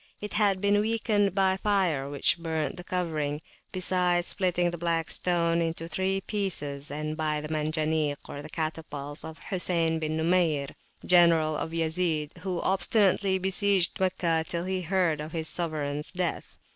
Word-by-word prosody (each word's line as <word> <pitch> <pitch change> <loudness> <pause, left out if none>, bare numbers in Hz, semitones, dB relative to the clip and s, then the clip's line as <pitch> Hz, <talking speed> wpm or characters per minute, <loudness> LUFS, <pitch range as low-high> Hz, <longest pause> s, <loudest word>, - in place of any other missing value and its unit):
It 210 - -6
had 205 -3 +2
been 205 0 +3
weakened 210 -3 +1
by 190 -1 +3
fire, 185 -10 +1
which 145 +4 +1
burnt 160 -4 -2
the 180 - -8
covering, 155 -5 -2 0.3
besides 180 -1 +1
splitting 175 -3 +1
the 175 - -5
Black 165 -1 -1
Stone 170 -1 +1
into 165 0 -2
three 190 +2 -1
pieces, 150 -10 -2
and 155 +2 -4
by 155 -1 -1
the 150 0 -6
Manjanik 155 -1 0 0.3
(catapults) 155 -2 -4
of 160 0 -8
Hosayn 180 -2 -1
([Arabic]) 165 -1 +1
bin 155 0 -1
Numayr, 160 -4 +2 0.4
general 165 -3 +5
of 160 - -3
Yazid, 160 -2 -1
who 180 0 -3
obstinately 195 0 +2
besieged 190 0 +2
Meccah 170 -3 +1
till 170 0 -2
he 185 0 -2
heard 175 -3 +1
of 155 +1 -7
his 160 -1 -2
sovereigns 150 -3 -2
death. 180 -2 -3
170 Hz, 150 wpm, -28 LUFS, 155-185 Hz, 0.4 s, general